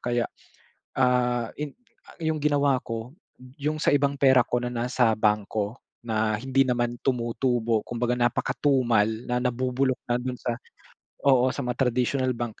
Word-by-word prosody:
Kaya, 120 -1 0 0.8
ah, 125 -2 +2
in 150 -1 -5 0.4
a - - -17
yung 160 -1 0
ginawa 145 -2 +3
ko, 115 +3 -6 0.4
yung 150 +2 -2
sa 145 - +2
ibang 140 0 +1
pera 130 -3 +6
ko 125 - -1
na 125 - -3
nasa 120 -1 +2
bangko 105 +1 0 0.2
na 110 -1 0
hindi 135 +2 +2
naman 120 -1 0
tumutubo, 120 -2 0
kumbaga 120 0 -1
napakatumal, 120 -2 +2 0.2
na 125 0 0
nabubulok 125 +1 0
na 120 - +1
do'n 125 0 -4
sa 120 +1 -2 0.7
oo 130 -2 +5
sa 140 - -3
mga 125 +2 0
traditional 130 +2 0
bank. 120 -1 -3
125 Hz, 150 wpm, -26 LUFS, 120-135 Hz, 0.8 s, pera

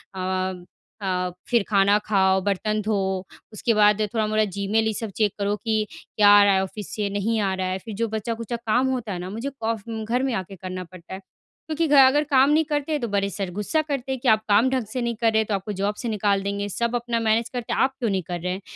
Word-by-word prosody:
अ 185 -1 -2 0.4
अ, 180 -2 -1 0.2
फिर 235 -4 +3
खाना 200 0 +4
खाओ 190 -2 +3
बर्तन 210 +2 -1
धो। 215 0 0 0.6
उसके 230 +2 0
बाद 210 0 +4
थोड़ा-मोड़ा 215 -1 +1
जीमेल 200 +3 0
ये 220 - 0
सब 220 0 -4
चेक 210 -3 +1
करो 200 +1 0
कि 220 -2 +1
क्या 205 -1 +1
आ 205 - +8
रहा 200 -1 +4
है 190 - +3
ऑफ़िस 200 +1 -7
से? 205 -2 -1
नहीं 205 +3 -1
आ 195 -2 0
रहा 185 0 -2
है 185 0 -1
फिर 220 +3 -8
जो 230 +3 -1
बचा-खुचा 225 +1 -3
काम 235 +3 +1
होता 245 -6 -2
है 180 - -4
ना 180 +1 -6
मुझे 225 +7 -4
कॉफ 230 -5 -3
घर 225 - -4 0.2
अगर 255 - +1
में 265 -2 0
आकर 190 -2 -4
करना 185 0 -5
पड़ता 180 0 -12
है 190 - -5
क्योंकि 310 - -5
घर 290 - +4
आकर 270 +2 +6
काम 270 +1 +5
नहीं 310 +1 +3
करते 295 0 -1
हैं 300 -2 0
तो 235 - -1
बड़े 200 0 0
सर 195 -2 -4
गुस्सा 310 +10 +1
करते 275 -4 -4
हैं 265 - -2
कि 260 - -2
आप 215 0 +4
काम 210 +5 +5
ढंग 260 -3 -1
से 255 - -2
नहीं 235 -1 -1
कर 225 -1 +3
रहे 220 0 +3
तो 215 - -4
आपको 200 +2 -3
जॉब 205 +1 0
से 235 - -2
निकाल 200 -2 +1
देंगे 200 +1 -3
सब 235 +4 -1
अपना 240 -1 -1
मैनेज 225 +1 +1
करते 245 -2 -4
हैं - - -1
आप 265 0 +2
क्यों 235 -4 0
नहीं 190 -2 -1
कर 175 +1 -5
रहे 180 +1 -2
हैं? 190 - -6
215 Hz, 255 wpm, -24 LUFS, 195-235 Hz, 0.6 s, आ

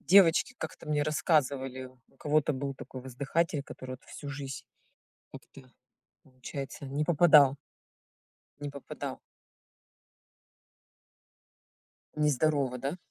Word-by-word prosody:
девочки 190 +4 +5
как-то - - -7
мне 150 -1 +1
рассказывали, 140 -4 +1 0.2
у - - -28
кого-то 150 0 +2
был 140 0 -3
такой 130 - -9
воздыхатель, 140 +4 -1
который 130 -1 -8
вот 130 - -10
всю 145 - -9
жизнь, 140 -3 -6 0.7
как-то, 130 -2 -13 0.5
получается, 135 +2 -7
не 140 +3 -1
попадал. 150 -4 +6 1.0
Не 145 0 -4
попадал. 140 -1 -6 3.0
Нездорово, 145 -3 +2
да? 140 +6 -3
140 Hz, 95 wpm, -30 LUFS, 130-150 Hz, 3.0 s, попадал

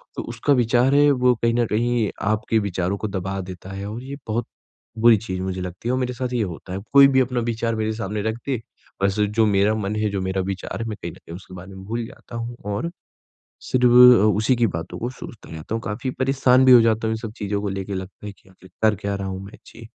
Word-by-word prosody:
तो - - -4
उसका 120 +5 +1
विचार 125 +2 +3
है 145 0 +6
वो 125 -1 +3
कहीं 115 0 +3
न 120 0 +2
कहीं 115 -1 +1 0.2
आपके 110 +1 +1
विचारों 95 -1 -2
को 110 - -3
दबा 95 0 -4
देता 95 +1 -9
है 100 +1 -6
और 120 +4 -6
ये 140 +1 -6
बहुत 115 +2 -1 0.5
बुरी 115 0 +6
चीज़ 95 -3 -5
मुझे 95 0 -3
लगती 90 +5 -6
है 125 - +1
और 130 - 0
मेरे 125 0 -2
साथ 125 0 -4
ये 115 -3 +1
होता 90 0 -7
है। 95 - -3
कोई 140 0 +9
भी 130 -1 +3
अपना 125 -1 -1
विचार 115 0 -1
मेरे 110 0 -1
सामने 105 -1 -3
रख 110 - -4
दे 130 -5 -2 0.4
बस 100 +2 +1
जो 105 +2 +2
मेरा 100 +1 +3
मन 105 0 -2
है, 105 0 0
जो 100 -1 -3
मेरा 95 0 -1
विचार 95 +4 -4
है 115 - -3
मैं 105 - -5
कहीं 85 - -5
न - - -14
कहीं 85 - -11
उसके 95 0 -12
बारे 90 +2 -10
में 95 - -10
भूल 115 +2 -3
जाता 120 - -12
हूँ 115 +1 -5 0.2
और 170 +11 -3 0.7
सिर्फ़ 125 -1 +1
अ, 125 -4 +8
उसी 110 +4 +2
की 115 -1 +2
बातों 80 -3 -5
को 120 - -2
सोचता 125 -5 -11
रहता 80 +7 -5
हूँ, 115 - -3
काफ़ी 115 +5 -3
परेशान 130 -1 +4
भी 130 - +7
हो 120 -2 +9
जाता 110 0 +1
हूँ 110 - 0
इन - - -4
सब 110 -2 -5
चीज़ों 100 0 -2
को 100 - -2
लेके 95 +1 -4
लगता 95 +2 -7
है 105 - -5
कि 95 - -23
आखिर 95 0 -18
कर 110 -1 +4
क्या 100 0 -3
रहा 100 0 -4
हूँ 95 0 -5
मैं? 100 - -12
जी, 115 - -12
110 Hz, 260 wpm, -22 LUFS, 95-120 Hz, 0.7 s, कोई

